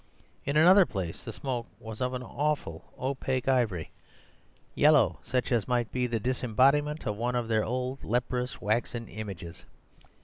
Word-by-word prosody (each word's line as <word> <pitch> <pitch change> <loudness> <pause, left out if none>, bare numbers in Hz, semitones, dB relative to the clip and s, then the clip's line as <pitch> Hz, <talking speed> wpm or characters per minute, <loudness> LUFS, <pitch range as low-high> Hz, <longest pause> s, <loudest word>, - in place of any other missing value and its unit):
In 140 +2 0
another 185 +4 +7
place 90 -6 -5
the - - -5
smoke 125 -4 -4
was 110 +1 -8
of 125 0 0
an 125 - -4
awful 140 - -3
opaque 130 -1 -2
ivory 115 -11 +1 0.8
yellow, - - +4
such 125 0 -1
as 115 -5 +1
might 120 -2 0
be 125 -1 0
the 115 -2 -1
disembodiment 130 +6 +2
of 105 -3 -2
one 120 +2 -1
of 120 -2 -1
their 110 -1 +2
old, 130 +3 -3
leprous 125 +2 -1
waxen 115 +2 -1
images. 95 -6 -8
125 Hz, 150 wpm, -29 LUFS, 110-130 Hz, 0.8 s, another